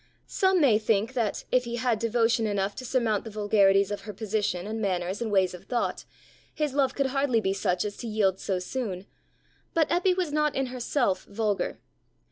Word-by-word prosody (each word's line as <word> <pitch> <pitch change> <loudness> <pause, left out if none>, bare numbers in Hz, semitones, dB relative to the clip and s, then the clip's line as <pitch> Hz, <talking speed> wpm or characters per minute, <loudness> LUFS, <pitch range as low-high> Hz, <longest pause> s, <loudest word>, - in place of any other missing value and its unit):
Some 380 -1 +2
may 245 -9 +5
think 220 +2 +1
that, 230 -5 -1
if 250 -1 +3
he 235 0 -4
had 240 -2 0
devotion 230 0 +2
enough 200 -1 -1
to 255 - -6
surmount 235 -5 0
the 225 - -7
vulgarities 200 -2 +3
of 205 -1 -3
her 210 +1 -8
position 205 -4 -2
and 220 +1 -4
manners 185 0 -1
and 225 -2 -2
ways 190 -2 +3
of 180 - -11
thought, 240 -2 -2 0.5
his 300 -3 -1
love 275 -2 +1
could 275 - +1
hardly 270 -3 +1
be 195 -3 0
such 185 -1 0
as 205 -1 -5
to 240 - -6
yield 200 -4 +1
so 190 - -1
soon; 190 -1 -4 0.7
but 320 -2 +3
Eppy 360 +1 +2
was 355 -5 -1
not 300 -1 +1
in 270 - 0
herself 245 -4 0
vulgar. 205 -1 -2
220 Hz, 195 wpm, -27 LUFS, 200-255 Hz, 0.7 s, may